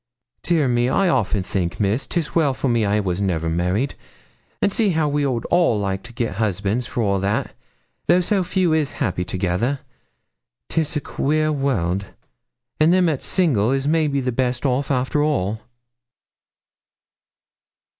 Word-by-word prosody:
Dear 160 -5 +2
me! 120 0 +2
I 195 +6 +2
often 105 - +1
think, 90 -2 -2
Miss, 105 +5 0
'tis 165 -4 -2
well 150 -5 +2
for 135 - -2
me 115 -4 +2
I 100 - +1
never 105 - +1
was 90 +1 -1
married. 90 - 0 0.7
And 200 - +1
see 220 -3 +2
how 160 -4 +1
we 145 0 0
all 130 -4 0
would 175 -10 +2
like 95 -1 -2
to 120 - -12
get 115 -5 -3
husbands 105 +2 -1
for 120 - -2
all 100 -2 +1
that, 100 +2 -1 0.5
though 180 - +5
so 190 +1 +1
few 180 -2 +1
is 155 -3 0
happy 90 0 -1
together. 95 +10 -1 0.9
'Tis 160 0 -1
a 150 - 0
queer 155 +3 0
world, 100 - -1 0.7
and 155 +2 +5
them 185 0 +4
that's 155 -5 0
single 130 - +2
is 135 +1 0
maybe 150 -3 +1
the 125 0 -1
best 125 +2 -1
off 135 +1 0
after 130 +2 +1
all.' 110 -8 0
125 Hz, 160 wpm, -21 LUFS, 100-155 Hz, 0.9 s, though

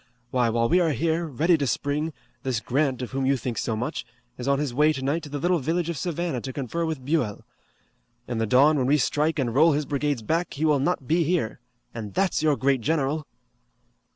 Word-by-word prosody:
Why, 125 -2 +2
while 115 +1 +1
we 180 - +4
are 165 -4 +2
here, 165 +3 0
ready 160 +4 +2
to 140 - 0
spring, 150 +5 -1 0.3
this 130 -4 -1
Grant, 130 +2 0
of 125 - -6
whom 135 0 -1
you 135 0 +3
think 115 -2 -3
so 110 - -1
much, 120 +3 -3 0.3
is 125 - -6
on 140 0 +3
his 145 -3 -2
way 150 +4 +4
tonight 140 +4 -1
to 150 - -9
the 145 - -4
little 175 +4 +1
village 165 +4 -1
of 170 - -3
Savannah 170 -6 -2
to 130 - -5
confer 140 +6 -3
with 150 -5 -4
Buell. 130 -9 -1 0.8
In 120 -2 -2
the 115 - 0
dawn 140 +6 +5
when 130 - +1
we 145 +2 +4
strike 150 +3 +1
and 125 -5 0
roll 155 +4 +5
his 150 +1 0
brigades 145 -3 -1
back 165 +9 -1
he 150 +3 0
will 150 -3 +3
not 140 -1 0
be 165 +2 +3
here. 160 -10 -1 0.3
And 105 -3 -7
that's 190 -5 +1
your 155 -2 +3
great 135 -2 +2
general!" 150 +2 0
145 Hz, 220 wpm, -25 LUFS, 130-160 Hz, 0.8 s, dawn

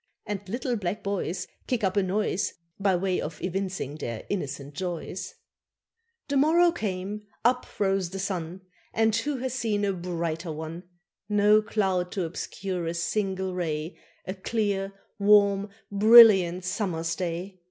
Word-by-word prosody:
And 205 -1 -3
little 245 +3 -1
black 200 +1 -3
boys 200 -2 -2 0.2
Kick 245 -4 -1
up 190 0 +1
a 200 - +4
noise 195 +1 0 0.3
By 195 -1 +3
way 185 0 0
of 150 0 -6
evincing 185 -5 -3
their 115 -6 -5
innocent 145 -6 -4
joys. 180 +2 -5 0.9
The 285 -1 0
morrow 335 +5 +5
came, 205 - -4 0.2
up 250 +1 +3
rose 195 -3 +1
the 190 - -6
sun, 185 -2 -3 0.3
And 220 -1 +3
who 280 +5 -1
hath 260 0 -3
seen 220 -5 0
a 200 - +1
brighter 170 -2 -3
one? 160 +3 -6 0.4
No 210 +1 +5
cloud 190 -4 0
to 190 - -1
obscure 180 +1 -4
a 165 - -2
single 190 +1 -1
ray, 160 -2 -3 0.3
A 185 - -3
clear, 200 -1 -1 0.3
warm, 200 0 +5 0.2
brilliant 200 -4 +7
summer's 165 -4 -1
day. 180 +2 -4
195 Hz, 140 wpm, -27 LUFS, 175-210 Hz, 0.9 s, brilliant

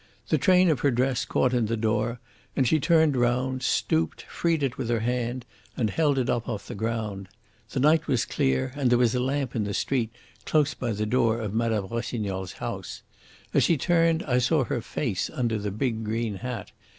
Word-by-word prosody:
The - - +3
train 185 -2 +5
of 145 - 0
her 140 - +3
dress 130 +1 +1
caught 130 -1 +1
in 120 -3 +2
the 115 +1 -1
door, 110 +2 0 0.4
and 130 -3 +2
she 155 - +3
turned 160 -1 +4
round, 125 +1 +1
stooped, 80 - 0
freed 165 -3 -1
it 130 -2 0
with 120 - -4
her 115 -2 +1
hand, 120 +1 -2 0.3
and 110 -4 0
held 150 -4 +2
it 130 - +1
up 120 - -1
off 100 -2 -4
the - - -6
ground. 105 -3 -3 0.4
The 130 - -2
night 155 +3 +4
was 125 -4 +1
clear, 65 - 0
and 140 -3 +1
there 120 - +4
was 120 -2 +3
a 125 - +1
lamp 135 0 -1
in 110 - 0
the 100 0 -3
street 125 -5 0 0.3
close 150 -2 +2
by 120 -3 -3
the 105 +1 -2
door 115 0 +2
of 105 -3 -4
Mme. 110 -3 0
Rossignol's 105 -5 -3
house. - - -6 0.5
As - - +4
she 165 - +3
turned 165 +2 +2
I 125 -3 +1
saw 135 +4 +2
her 120 0 -2
face 110 -5 -2
under 115 -3 -1
the 105 0 -3
big 110 +2 -2
green 110 -1 -2
hat. 120 -2 -5
120 Hz, 205 wpm, -26 LUFS, 110-135 Hz, 0.5 s, train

